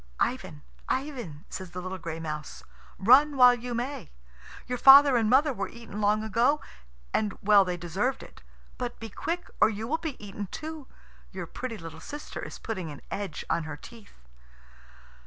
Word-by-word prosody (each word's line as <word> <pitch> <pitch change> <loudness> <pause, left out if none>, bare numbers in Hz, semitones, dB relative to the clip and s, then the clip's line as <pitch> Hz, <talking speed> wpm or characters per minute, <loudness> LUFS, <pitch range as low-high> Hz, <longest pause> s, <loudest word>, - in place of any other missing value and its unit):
"Ivan, 75 -1 -2 0.3
Ivan," 245 - -3
says 185 -1 -7
the 180 - -6
little 185 +1 -5
gray 165 -1 -5
mouse, 155 -2 -6 0.3
"run 270 +8 +6
while 250 -1 +8
you 245 0 -4
may. 250 - -4 0.6
Your 250 -1 -3
father 275 +1 +9
and 225 -3 +2
mother 275 +4 +4
were 195 -4 -3
eaten 230 -3 -8
long 210 +1 +2
ago, 235 +7 +2 0.5
and 210 -2 0
well 205 -1 +7
they 180 -1 -3
deserved 190 +10 -2
it. - - -14 0.4
But 245 -1 -4
be 225 - -7
quick, 350 +1 -4
or 215 - +7
you 220 +1 -4
will 320 +5 0
be 315 -5 -5
eaten 205 0 -7
too. 310 - -7 0.4
Your - - -5
pretty 245 -3 -6
little 165 -3 -9
sister 295 - -7
is - - -7
putting 185 -7 -5
an 145 - -10
edge 200 -1 -4
on 165 - 0
her 150 -2 -6
teeth!" 225 +5 -14
220 Hz, 175 wpm, -28 LUFS, 185-255 Hz, 0.6 s, father